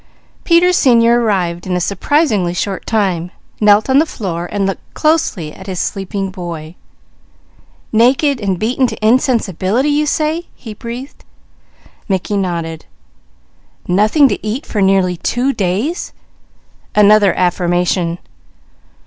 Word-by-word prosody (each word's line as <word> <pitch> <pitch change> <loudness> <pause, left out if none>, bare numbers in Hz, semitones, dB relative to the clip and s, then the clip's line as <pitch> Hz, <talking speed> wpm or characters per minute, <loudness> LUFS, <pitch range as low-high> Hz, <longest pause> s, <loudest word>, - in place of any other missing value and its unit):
Peter 350 +1 +4
Senior 235 -6 +4
arrived 180 -6 -1
in 180 - -1
a - - +1
surprisingly 200 - 0
short 195 +1 -3
time, 185 -6 0 0.3
knelt 210 0 +4
on 265 +1 +4
the 315 - +3
floor 175 - -5
and 200 -1 -1
looked 195 -1 -5
closely 305 - 0
at 190 - -12
his 185 -2 -4
sleeping 195 0 -3
boy. 170 -4 -7 1.2
"Naked 255 +4 +2
and 195 -3 -1
beaten 250 +6 +1
to 220 -2 -5
insensibility, 230 - +1
you 300 +1 +1
say?" 315 +3 -1 1.6
Mickey 195 +2 -1
nodded. 170 -4 -3 1.0
"Nothing 215 - +4
to - - -3
eat 220 +7 -3
for 210 - -2
nearly 190 -2 +2
two 250 +9 -1
days?" 210 - -2 0.8
Another 210 -2 +5
affirmation. 175 -1 0
205 Hz, 115 wpm, -16 LUFS, 180-250 Hz, 1.6 s, Another